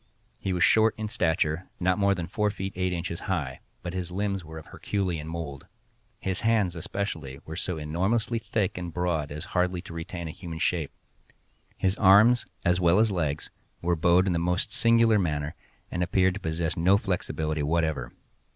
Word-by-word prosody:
He 95 Hz, -, -2 dB
was 90 Hz, -2 st, +2 dB
short 110 Hz, 0 st, +5 dB
in 110 Hz, -1 st, -3 dB
stature, 80 Hz, -2 st, 0 dB
not 90 Hz, +2 st, +2 dB
more 100 Hz, -1 st, +3 dB
than 85 Hz, -2 st, -3 dB
four 105 Hz, +2 st, 0 dB
feet 95 Hz, -1 st, -5 dB
eight 90 Hz, 0 st, 0 dB
inches 85 Hz, -1 st, -3 dB
high, 65 Hz, 0 st, -1 dB, 0.2 s
but 90 Hz, 0 st, -4 dB
his 90 Hz, -2 st, -3 dB
limbs 100 Hz, 0 st, -1 dB
were 80 Hz, 0 st, -9 dB
of 80 Hz, -, -9 dB
Herculean 90 Hz, -6 st, -3 dB
mould. 80 Hz, -4 st, -6 dB, 0.5 s
His 95 Hz, -3 st, -2 dB
hands, 110 Hz, -6 st, +2 dB
especially, 80 Hz, -6 st, -4 dB
were 80 Hz, -, -6 dB
so 85 Hz, 0 st, -3 dB
enormously 95 Hz, +10 st, 0 dB
thick 105 Hz, -4 st, -1 dB
and 90 Hz, -1 st, -5 dB
broad 85 Hz, -4 st, -1 dB
as 75 Hz, +4 st, -5 dB
hardly 90 Hz, 0 st, +1 dB
to 85 Hz, -, -9 dB
retain 85 Hz, +1 st, -5 dB
a -, -, -4 dB
human 85 Hz, 0 st, -7 dB
shape. 80 Hz, -3 st, 0 dB, 0.9 s
His 95 Hz, 0 st, +1 dB
arms, 105 Hz, +5 st, +6 dB, 0.2 s
as 90 Hz, +1 st, +3 dB
well 85 Hz, 0 st, +4 dB
as 110 Hz, 0 st, +4 dB
legs, 75 Hz, -5 st, -2 dB, 0.3 s
were 85 Hz, 0 st, +2 dB
bowed 85 Hz, +3 st, +4 dB
in 95 Hz, -, +1 dB
the 85 Hz, -, +1 dB
most 90 Hz, +2 st, 0 dB
singular 115 Hz, -2 st, +5 dB
manner, 75 Hz, -4 st, -1 dB, 0.4 s
and 90 Hz, -, -2 dB
appeared 95 Hz, +1 st, +3 dB
to 100 Hz, -, -5 dB
possess 80 Hz, -2 st, -2 dB
no 90 Hz, +4 st, +4 dB
flexibility 80 Hz, -6 st, -2 dB
whatever. 75 Hz, -5 st, 0 dB
90 Hz, 180 wpm, -27 LUFS, 80-95 Hz, 0.9 s, arms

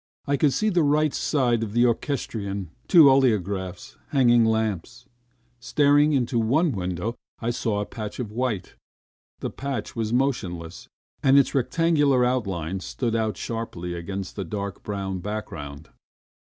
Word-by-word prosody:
I 140 Hz, -, +1 dB
could 140 Hz, 0 st, +3 dB
see 215 Hz, +10 st, +1 dB
the 180 Hz, -4 st, +2 dB
right 150 Hz, 0 st, +2 dB
side 125 Hz, -6 st, +1 dB
of 110 Hz, -2 st, -4 dB
the 120 Hz, +1 st, +4 dB
orchestrion, 105 Hz, -, -2 dB, 0.2 s
two 165 Hz, -6 st, +8 dB
oleographs, 100 Hz, -9 st, +1 dB
hanging 120 Hz, -4 st, +4 dB
lamps.... 110 Hz, -1 st, -1 dB, 0.5 s
Staring 145 Hz, +3 st, +3 dB
into 120 Hz, -3 st, +1 dB
one 140 Hz, +9 st, +2 dB
window, 95 Hz, +1 st, -3 dB, 0.3 s
I 115 Hz, +1 st, -1 dB
saw 110 Hz, -3 st, -1 dB
a -, -, -2 dB
patch 105 Hz, 0 st, -7 dB
of 115 Hz, -4 st, -4 dB
white. 110 Hz, -5 st, -2 dB, 0.7 s
The -, -, -3 dB
patch 140 Hz, -1 st, -5 dB
was 110 Hz, -2 st, -2 dB
motionless, 105 Hz, -11 st, -2 dB, 0.3 s
and 135 Hz, +1 st, +5 dB
its 140 Hz, -, +4 dB
rectangular 145 Hz, -2 st, +2 dB
outlines 95 Hz, -8 st, -2 dB
stood 115 Hz, -3 st, -2 dB
out 110 Hz, -3 st, -1 dB
sharply 100 Hz, -7 st, -4 dB
against 95 Hz, +2 st, -5 dB
the 100 Hz, -, -3 dB
dark, 100 Hz, +2 st, -5 dB
brown 95 Hz, -2 st, -4 dB
background. 80 Hz, -7 st, -6 dB
115 Hz, 140 wpm, -25 LUFS, 100-135 Hz, 0.7 s, two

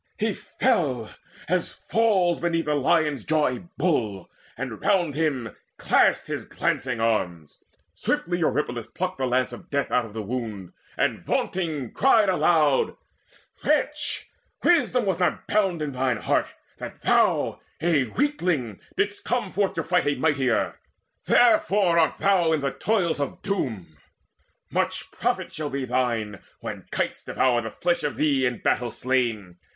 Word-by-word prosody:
He 215 Hz, 0 st, 0 dB
fell, 170 Hz, -, 0 dB, 0.4 s
as 180 Hz, 0 st, 0 dB
falls 195 Hz, -7 st, +2 dB
beneath 165 Hz, -2 st, 0 dB
a 150 Hz, -, +2 dB
lion's 150 Hz, -2 st, +2 dB
jaws 150 Hz, -5 st, +1 dB
A 175 Hz, -, -14 dB
bull, 115 Hz, -, -1 dB, 0.3 s
and 120 Hz, -4 st, -5 dB
round 175 Hz, -7 st, +2 dB
him 135 Hz, -7 st, -1 dB, 0.2 s
clashed -, -, +3 dB
his -, -, -4 dB
glancing 125 Hz, -3 st, -2 dB
arms. 90 Hz, -9 st, -1 dB, 0.3 s
Swiftly 175 Hz, +1 st, -1 dB
Eurypylus 125 Hz, -8 st, -1 dB
plucked 185 Hz, 0 st, -4 dB
the 130 Hz, -, +1 dB
lance 125 Hz, 0 st, +1 dB
of 120 Hz, -, -11 dB
death 140 Hz, -1 st, -1 dB
Out 125 Hz, -1 st, +2 dB
of 110 Hz, -, -11 dB
the 110 Hz, -1 st, -4 dB
wound, 110 Hz, -5 st, -5 dB, 0.2 s
and -, -, +1 dB
vaunting 155 Hz, -9 st, -2 dB
cried 225 Hz, -7 st, +4 dB
aloud: 155 Hz, -6 st, +3 dB, 0.7 s
"Wretch, 300 Hz, 0 st, 0 dB, 0.4 s
wisdom 255 Hz, -8 st, +3 dB
was 190 Hz, -3 st, 0 dB
not 180 Hz, -, 0 dB
bound 190 Hz, -6 st, +1 dB
up 150 Hz, -, -2 dB
in -, -, -8 dB
thine 130 Hz, -2 st, 0 dB
heart, -, -, +1 dB, 0.3 s
That -, -, -8 dB
thou, -, -, +2 dB, 0.2 s
a 160 Hz, -4 st, +2 dB
weakling, 175 Hz, -, -1 dB, 0.2 s
didst 205 Hz, 0 st, -1 dB
come 240 Hz, -6 st, -1 dB
forth 200 Hz, 0 st, 0 dB
to -, -, -1 dB
fight 180 Hz, -3 st, +1 dB
A 145 Hz, -, +2 dB
mightier. 135 Hz, -5 st, +1 dB, 0.5 s
Therefore 205 Hz, -7 st, +4 dB
art 160 Hz, -2 st, +2 dB
thou 180 Hz, -5 st, +3 dB
in 155 Hz, -, +1 dB
the 140 Hz, -1 st, 0 dB
toils 185 Hz, -6 st, 0 dB
Of 140 Hz, -, -4 dB
Doom. 110 Hz, -, -3 dB, 0.7 s
Much -, -, -1 dB
profit -, -, -2 dB
shall 155 Hz, -1 st, -3 dB
be 140 Hz, -1 st, -3 dB
thine, 120 Hz, -5 st, -1 dB, 0.2 s
when -, -, -7 dB
kites -, -, -2 dB
Devour 125 Hz, -2 st, +1 dB
the 110 Hz, -, -5 dB
flesh 175 Hz, +9 st, 0 dB
of 150 Hz, -1 st, -2 dB
thee 140 Hz, -4 st, +2 dB
in 125 Hz, -1 st, -4 dB
battle 120 Hz, -1 st, +1 dB
slain! 115 Hz, -8 st, -1 dB
150 Hz, 150 wpm, -25 LUFS, 125-180 Hz, 0.7 s, cried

